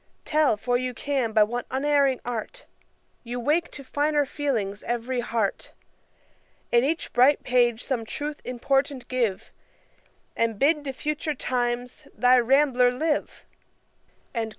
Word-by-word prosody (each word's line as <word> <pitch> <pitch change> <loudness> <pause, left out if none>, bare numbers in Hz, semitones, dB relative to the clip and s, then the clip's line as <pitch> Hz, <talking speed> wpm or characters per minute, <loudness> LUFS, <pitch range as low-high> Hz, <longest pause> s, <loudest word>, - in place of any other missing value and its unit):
Tell, 300 -8 +2
for 245 +3 0
you 255 -1 -3
can, 270 -5 -1
by 215 -1 +5
what 240 +3 -3
unerring 275 -1 +2
art 245 - -5 0.6
You 245 +1 -5
wake 300 +7 +1
to 275 - -10
finer 290 +2 +1
feelings 230 -9 -2
every 240 +2 -2
heart; 230 -4 -2 1.0
In 240 0 +4
each 320 +5 -2
bright 260 +4 +4
page 240 -2 +2
some 250 -4 -2
truth 290 +6 -5
important 270 +2 -1
give, 235 -7 -1 0.8
And 230 -2 0
bid 295 +4 +2
to 270 - -2
future 300 +2 -3
times 245 -1 -3
thy 250 0 +5
RAMBLER 250 0 +4
live? 300 +4 -2
255 Hz, 130 wpm, -25 LUFS, 240-290 Hz, 1.0 s, by